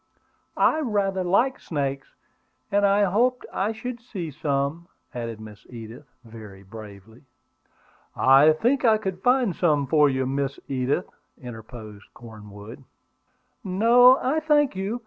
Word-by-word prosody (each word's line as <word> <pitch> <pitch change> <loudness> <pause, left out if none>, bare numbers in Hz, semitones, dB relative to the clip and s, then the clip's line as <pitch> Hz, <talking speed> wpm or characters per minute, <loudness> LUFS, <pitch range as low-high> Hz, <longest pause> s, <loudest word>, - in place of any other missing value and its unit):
"I 315 - +3
rather 200 -8 -1
like 235 +9 +1
snakes, 140 -3 -4 0.6
and 200 0 +3
I 200 +1 +3
hoped 240 +6 +1
I 200 +3 -1
should 235 +2 -7
see 185 -9 -7
some," 140 +4 -3 0.3
added 115 -2 -6
Miss 105 0 -12
Edith, 115 +3 -11 0.2
very 105 -4 -12
bravely. 105 +1 -13 0.9
"I 135 +4 +5
think 245 - 0
I 220 -3 +4
could 190 -3 -5
find 245 -6 +2
some 150 -5 +1
for 150 +2 +3
you, 130 -1 -1
Miss 135 +1 -3
Edith," 135 +5 -1 0.3
interposed 110 -3 -11
Cornwood. 105 +1 -12 0.8
"No, 235 +7 +5
I 280 +5 -1
thank 295 -5 +2
you. 200 +5 -3
155 Hz, 125 wpm, -24 LUFS, -, 0.9 s, I